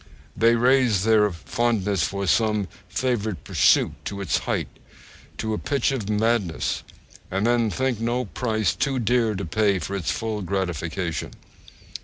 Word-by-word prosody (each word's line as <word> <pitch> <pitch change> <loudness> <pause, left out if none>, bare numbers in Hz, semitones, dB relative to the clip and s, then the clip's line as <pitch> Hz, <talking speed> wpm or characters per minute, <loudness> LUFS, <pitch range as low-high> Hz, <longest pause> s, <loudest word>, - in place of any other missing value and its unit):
They 115 +1 +4
raise 120 -4 +3
their 105 -2 +4
fondness 105 0 0
for 100 0 -1
some 105 0 +2 0.2
favourite 110 -4 -1
pursuit - - +3
to 100 - -4
its 100 -4 0
height, - - 0 0.7
to 110 0 -2
a 105 - -2
pitch 140 -3 0
of 115 -7 -3
madness, 105 -5 0 0.5
and 115 +3 +1
think 130 -2 -1
no 120 +2 -1
price 110 -3 -1
too 135 -2 -1
dear 115 -2 +1
to 95 0 -4
pay 100 +3 +2
for 95 +3 -4
its 90 -5 -2
full 110 -2 -2
gratification. 90 -2 -3
110 Hz, 140 wpm, -24 LUFS, 100-120 Hz, 0.7 s, They